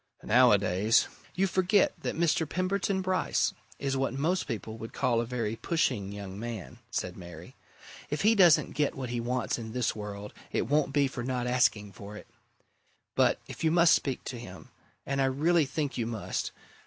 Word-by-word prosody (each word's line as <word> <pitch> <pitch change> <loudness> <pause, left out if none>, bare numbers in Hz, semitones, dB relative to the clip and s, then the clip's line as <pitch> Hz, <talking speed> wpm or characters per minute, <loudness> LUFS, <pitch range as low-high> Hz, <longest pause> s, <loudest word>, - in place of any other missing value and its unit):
Nowadays 105 -3 +4
" - - -26
"You 190 - +2
forget 185 +2 +3
that - - -3
Mr. 165 -2 +1
Pemberton 190 +2 0
Bryce 185 0 +1 0.2
is 135 -1 -2
what 135 0 -1
most 165 +7 0
people 110 0 -5
would 115 - -8
call 120 -3 +1
a 120 - -4
very 115 -3 -2
pushing 120 - -1
young 100 -1 -7
man," 115 0 -6
said 90 -7 -3
Mary. 85 -2 -11 0.5
"If 150 - -2
he 220 +2 +6
doesn't 180 -7 +5
get 145 -1 0
what 130 -3 -5
he 120 - -1
wants 125 +1 -1
in 110 -1 -7
this 125 -2 0
world, 105 -1 -7 0.2
it - - 0
won't 145 -1 +2
be 140 0 +3
for 130 -2 -5
not 125 -1 -2
asking 120 -5 +2
for 100 +2 -10
it. - - -11 0.9
But - - +3
if - - -8
you 160 - +4
must 170 +1 +5
speak 135 -3 0
to 125 - -6
him 95 -5 -11 0.4
and 140 0 -1
I - - +4
really 150 +4 +2
think 145 -2 -3
you 115 - -1
must! 115 -3 -3
125 Hz, 185 wpm, -29 LUFS, 110-155 Hz, 0.9 s, he